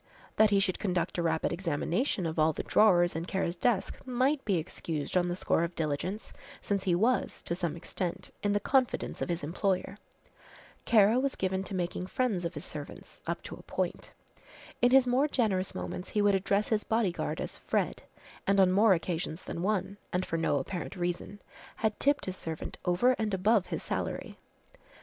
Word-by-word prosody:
That 215 0 +6
he 200 -1 +4
should 190 -2 0
conduct 180 -3 -1
a - - +2
rapid 160 -1 0
examination 175 - -1
of 160 0 -2
all 155 +1 +4
the - - -4
drawers 175 -6 +4
in 165 +1 -2
Kara's 180 -2 -1
desk 205 +1 0
might 260 +3 +1
be 195 -4 +2
excused 155 -1 -4
on 180 -1 +3
the 175 - -1
score 170 - +1
of 170 +1 -3
diligence, 165 +7 -3 0.3
since 200 -1 -2
he 180 -3 +3
was, 235 +7 +1
to - - -2
some 170 -3 -2
extent, 170 +1 -4
in 205 0 +1
the 205 - +2
confidence 260 +2 0
of - - -2
his 170 -2 -2
employer. 190 +5 -1 0.9
Kara 220 +1 +5
was 275 0 0
given 190 0 -1
to 195 - -4
making 180 0 -2
friends 215 -7 0
of 170 - -3
his - - -5
servants - - -8
up - - -2
to - - -7
a - - -10
point. - - -3 0.7
In 245 - +6
his 265 0 +6
more 255 +4 +3
generous 205 -9 0
moments 180 - -5
he 210 - +1
would 205 -1 +4
address 200 +2 +1
his 215 -2 +1
bodyguard 220 -6 0
as - - -4
"Fred," - - -1 0.5
and 195 0 +4
on 185 -1 +6
more 200 +1 +5
occasions 170 0 -3
than 170 - -5
one, 195 0 -1
and 180 +1 0
for - - -3
no 165 -3 +1
apparent 165 +5 -4
reason, 175 +3 -3 0.4
had 220 -1 -1
tipped 285 +1 +2
his 185 - -4
servant 160 -3 -6
over 180 +9 +4
and 215 -3 0
above 200 +1 +3
his - - -4
salary. - - -4
190 Hz, 190 wpm, -30 LUFS, 175-215 Hz, 0.9 s, That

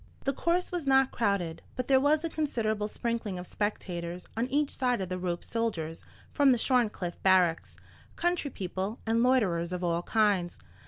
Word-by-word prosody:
The 275 - 0
course 345 +6 0
was 345 -5 -3
not 265 0 +4
crowded, 195 -7 -1
but 255 -1 -3
there 265 -1 +5
was 295 +3 +3
a 330 - -1
considerable 220 -9 -1
sprinkling 230 -3 -3
of 180 - -6
spectators 180 -4 -4
on 230 +2 0
each 285 +2 +1
side 250 -3 0
of 190 -2 -3
the 185 0 -3
rope—soldiers 175 -2 -3 0.3
from 285 -1 +4
the 250 - +5
Shorncliffe 225 -8 0
barracks, 185 -3 +3 0.4
country 345 -4 0
people, 190 0 -4
and 225 +1 +2
loiterers 195 -10 +2
of 180 0 -3
all 170 -1 +1
kinds. 200 -4 +1
215 Hz, 165 wpm, -29 LUFS, 180-260 Hz, 0.4 s, there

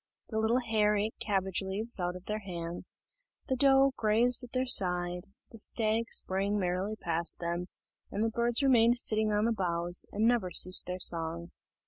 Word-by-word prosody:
The 220 - -2
little 230 +3 +1
hare 215 -3 +1
ate 215 +2 -2
cabbage 195 -3 -1
leaves 200 +4 +1
out 175 0 -2
of 180 - -11
their 215 0 -3
hands, 175 -3 -3 0.5
the 260 - 0
doe 270 +1 +4
grazed 235 +4 +1
at 245 - -11
their 255 0 -1
side, 180 -6 +2 0.3
the 225 - -10
stag 220 +1 0
sprang 195 +2 0
merrily 185 +3 -2
past 170 -4 -2
them, 170 +1 -4 0.4
and 210 - -3
the 225 - -1
birds 235 +3 0
remained 240 -3 +4
sitting 215 -2 +3
on 210 +1 +1
the 235 - +1
boughs, 175 -4 -1
and 210 +2 -1
never 235 -6 +1
ceased 185 0 +4
their 180 0 -4
songs. 170 0 -2
210 Hz, 175 wpm, -30 LUFS, 180-230 Hz, 0.5 s, doe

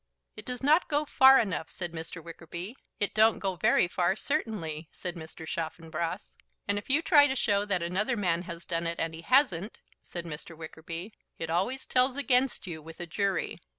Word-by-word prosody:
"It - - -9
does 250 +1 -4
not 310 +5 +4
go 295 0 +1
far 265 -1 +7
enough," 185 -8 0
said 175 -2 -4
Mr. 165 0 -7
Wickerby. 170 +5 -7 0.2
"It 205 - -1
don't 220 +1 +5
go 190 -2 -2
very 175 - +3
far, 180 +1 +1
certainly," 185 - -3
said 180 - -4
Mr. 160 -1 -9
Chaffanbrass. 165 +2 -4 0.3
"And 200 0 +1
if 205 - -15
you 295 +5 +3
try 290 -5 +7
to 265 - -1
show 205 -5 +1
that 185 -4 0
another 210 +8 0
man 175 -4 +1
has 170 0 -6
done 170 -1 -1
it, 170 - -3
and 165 0 -1
he 160 - -8
hasn't," 210 - +2 0.2
said 175 -1 -6
Mr. 165 0 -8
Wickerby, 165 +5 -7 0.2
"it 165 0 -4
always 200 +11 0
tells 255 +1 +2
against 265 -4 +2
you 165 -4 -6
with 160 +1 -12
a 175 - -4
jury." 195 +3 -1
180 Hz, 190 wpm, -29 LUFS, 165-240 Hz, 0.3 s, far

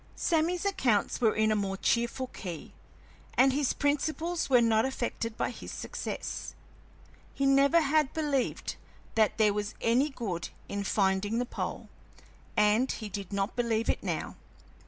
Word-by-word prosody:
Sammy's 340 +2 +1
accounts 250 - +1
were 220 -3 +3
in 220 0 +3
a - - +3
more 195 -2 -1
cheerful 235 +5 0
key, 180 -9 -8 0.6
and 260 +1 +5
his 285 -1 +1
principles 315 +4 -1
were 250 -2 +6
not 225 -1 +3
affected 235 -3 -3
by - - -1
his - - -9
success. - - -5 0.8
He 275 - 0
never 275 +4 +5
had 300 -1 +2
believed 290 -5 -1 0.4
that 220 -1 +2
there 215 -2 +4
was 210 0 -3
any 250 +6 +2
good 200 - -4 0.2
in 200 0 -3
finding 195 +2 +1
the 245 - 0
pole, - - -5 0.7
and 210 +5 +4
he 215 -2 -5
did 200 -1 -6
not 200 +2 -1
believe 230 -2 0
it - - -6
now. - - -3
235 Hz, 150 wpm, -29 LUFS, 210-275 Hz, 0.8 s, were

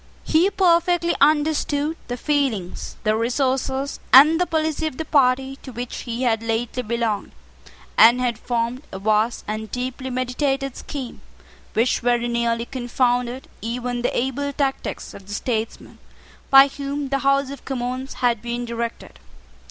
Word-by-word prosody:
He 330 +5 +3
perfectly 345 -2 +2
understood 300 0 +2
the 245 - -4
feelings, 255 - -1
the 215 -1 +2
resources, 265 +3 -1
and 305 +6 +8
the 360 - +2
policy 315 0 0
of 280 - -6
the 320 - -3
party 270 -2 +2
to 265 - -11
which 245 +1 -6
he 235 +2 -2
had 225 -3 +2
lately 230 +2 -2
belonged, 230 -3 -2 0.7
and 235 +3 +8
had 240 -3 -1
formed 240 +1 -2
a - - -6
vast 215 +3 +1
and 215 +1 -4
deeply 255 +1 -4
meditated 270 +1 -1
scheme 265 -4 -7 0.5
which 230 +3 +2
very 240 0 +1
nearly 235 -1 0
confounded 245 0 -1
even 245 +2 -3
the 245 - -1
able 265 +3 -1
tactics 275 -1 -3
of 195 - -12
the 205 - -4
statesmen 225 -1 -4 0.5
by 270 0 +9
whom 280 0 -4
the 275 0 0
House 275 0 +2
of 280 - -9
Commons 255 +1 -4
had 235 -3 +2
been 240 0 -3
directed. 235 0 -5
250 Hz, 145 wpm, -22 LUFS, 235-280 Hz, 0.7 s, by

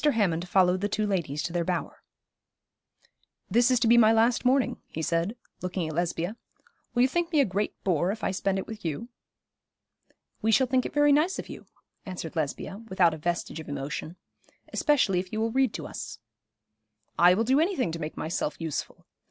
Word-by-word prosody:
Hammond 190 - +1
followed 185 -1 +3
the 205 - 0
two 215 +1 0
ladies 160 -7 -1
to 165 - -4
their 175 -1 +1
bower. 175 0 -3 1.5
'This 240 +4 +4
is 255 -2 +3
to 230 - +2
be 235 +1 +7
my 220 -1 +6
last 230 +2 +3
morning,' 255 +1 +2
he 160 - -5
said, 170 +7 0 0.3
looking 180 -2 -2
at 155 - -5
Lesbia. 175 +5 -2 0.6
'Will 245 - +5
you - - +5
think 345 +4 -1
me 310 - +3
a 280 - +5
great 200 +1 -2
bore 175 0 +1
if 215 +1 -7
I - - +1
spend 195 +1 -1
it 190 - -3
with 220 -1 -9
you?' 170 +9 -4 1.3
'We 225 0 +2
shall 260 - +5
think 255 0 +1
it - - -12
very 290 0 +5
nice 315 +7 +3
of - - -6
you,' - - -10 0.4
answered 180 -4 -6
Lesbia, 160 +5 -3
without 180 -3 +3
a - - -5
vestige 170 0 -2
of 155 - -9
emotion; 145 +4 -5 0.6
'especially 255 - +2
if 185 0 -6
you 215 - -2
will 225 +1 0
read 260 -1 +2
to - - -5
us.' - - -7 1.0
'I 180 +1 +7
will 225 - +1
do 260 +5 +3
any 365 +5 +2
thing 255 - 0
to 165 - -5
make 155 -1 -5
myself 155 -2 -2
useful. 160 -3 -5
195 Hz, 200 wpm, -27 LUFS, 170-240 Hz, 1.5 s, be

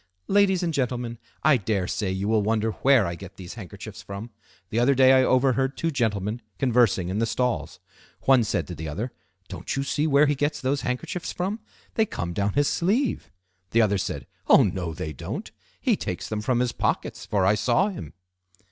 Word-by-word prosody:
"Ladies 195 -2 +3
and 165 -2 0
gentlemen, 120 -4 -2 0.2
I 155 -3 +5
dare 100 -4 -1
say 100 -3 -2
you 95 +2 -2
will 110 -1 +3
wonder 110 +1 +1
where 130 -1 +4
I 85 - -2
get 95 +2 -10
these 90 0 -8
handkerchiefs 105 -1 -9
from. 100 +4 -7 0.4
The 115 - +1
other 130 +3 +4
day 130 0 +6
I 130 0 +6
overheard 130 +1 +2
two 165 - 0
gentlemen 110 -4 -1 0.2
conversing 120 -8 +2
in 100 +3 -1
the 115 - +1
stalls. 125 +1 -1 0.4
One 130 -3 +5
said 105 - -1
to - - -4
the 80 0 -6
other, 105 - -4 0.4
'Don't - - -5
you 135 - 0
see 145 +2 0
where 145 0 +5
he 145 - +2
gets 145 +1 -1
those 135 +1 0
handkerchiefs 125 +8 -3
from? 195 +5 -2 0.3
They 220 -1 +2
come 85 - -4
down 100 +2 0
his 145 0 +2
sleeve.' 205 - 0 0.4
The 115 0 +4
other 100 -2 +2
said, - - -4 0.2
'Oh! - - +7
no, 90 -3 -2
they 80 -2 -4
don't. 65 - -6 0.3
He - - +2
takes - - -4
them 110 -1 -3
from 120 +2 +1
his 125 -1 +1
pockets, - - -2
for 100 -3 +1
I 100 - +5
saw 125 - +2
him. 80 - -8
120 Hz, 200 wpm, -25 LUFS, 100-140 Hz, 0.4 s, Oh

